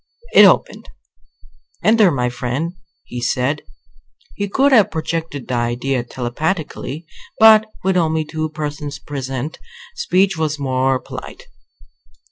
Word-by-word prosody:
It -, -, +9 dB
opened. -, -, +2 dB, 0.9 s
"Enter, 215 Hz, -3 st, +5 dB
my 125 Hz, -5 st, 0 dB
friend," 125 Hz, +7 st, -3 dB, 0.3 s
he 120 Hz, -, -6 dB
said. 130 Hz, +5 st, 0 dB, 0.7 s
He 200 Hz, 0 st, -3 dB
could 275 Hz, +7 st, +3 dB
have 220 Hz, -7 st, +6 dB
projected 160 Hz, -4 st, -4 dB
the -, -, -3 dB
idea 120 Hz, +2 st, -1 dB
telepathically; 150 Hz, +5 st, -4 dB, 0.3 s
but 220 Hz, 0 st, +7 dB, 0.2 s
with 190 Hz, 0 st, +2 dB
only 160 Hz, -2 st, +1 dB
two 155 Hz, +1 st, -3 dB
persons 150 Hz, -1 st, -5 dB
present, 135 Hz, 0 st, -5 dB, 0.4 s
speech 195 Hz, -, +2 dB
was 155 Hz, -1 st, -1 dB
more 130 Hz, -1 st, +1 dB
polite. -, -, -9 dB
150 Hz, 115 wpm, -19 LUFS, 130-175 Hz, 0.9 s, It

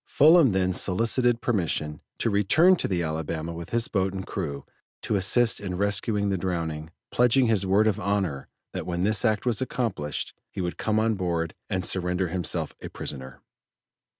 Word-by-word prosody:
Fullam 155 Hz, -2 st, +6 dB
then 95 Hz, -1 st, +1 dB
solicited 115 Hz, +6 st, +2 dB
permission 85 Hz, -10 st, -1 dB, 0.2 s
to 115 Hz, -, 0 dB
return 130 Hz, -, +5 dB
to -, -, -2 dB
the 90 Hz, -3 st, -1 dB
Alabama 80 Hz, +1 st, -3 dB
with 85 Hz, 0 st, -8 dB
his 115 Hz, 0 st, 0 dB
boat 95 Hz, -2 st, 0 dB
and 95 Hz, -, -5 dB
crew 70 Hz, -7 st, -5 dB, 0.4 s
to -, -, -1 dB
assist 110 Hz, +5 st, +2 dB
in 95 Hz, -3 st, -4 dB
rescuing 100 Hz, +1 st, +1 dB
the 95 Hz, -2 st, -1 dB
drowning, 80 Hz, -4 st, -3 dB, 0.2 s
pledging 125 Hz, +2 st, +4 dB
his 105 Hz, -4 st, +1 dB
word 100 Hz, +3 st, +4 dB
of 110 Hz, -1 st, +1 dB
honor 100 Hz, -9 st, -1 dB, 0.3 s
that -, -, -5 dB
when 90 Hz, 0 st, -2 dB
this 110 Hz, +2 st, +1 dB
act 110 Hz, +1 st, +1 dB
was 120 Hz, -1 st, +1 dB
accomplished, 115 Hz, -, -3 dB, 0.2 s
he -, -, -8 dB
would 90 Hz, -1 st, -3 dB
come 110 Hz, -1 st, 0 dB
on 110 Hz, +1 st, +2 dB
board 85 Hz, -4 st, -2 dB, 0.2 s
and 95 Hz, -1 st, -1 dB
surrender 90 Hz, -1 st, 0 dB
himself 90 Hz, -1 st, -2 dB
a -, -, -7 dB
prisoner. 65 Hz, -2 st, -6 dB
95 Hz, 175 wpm, -26 LUFS, 85-110 Hz, 0.4 s, Fullam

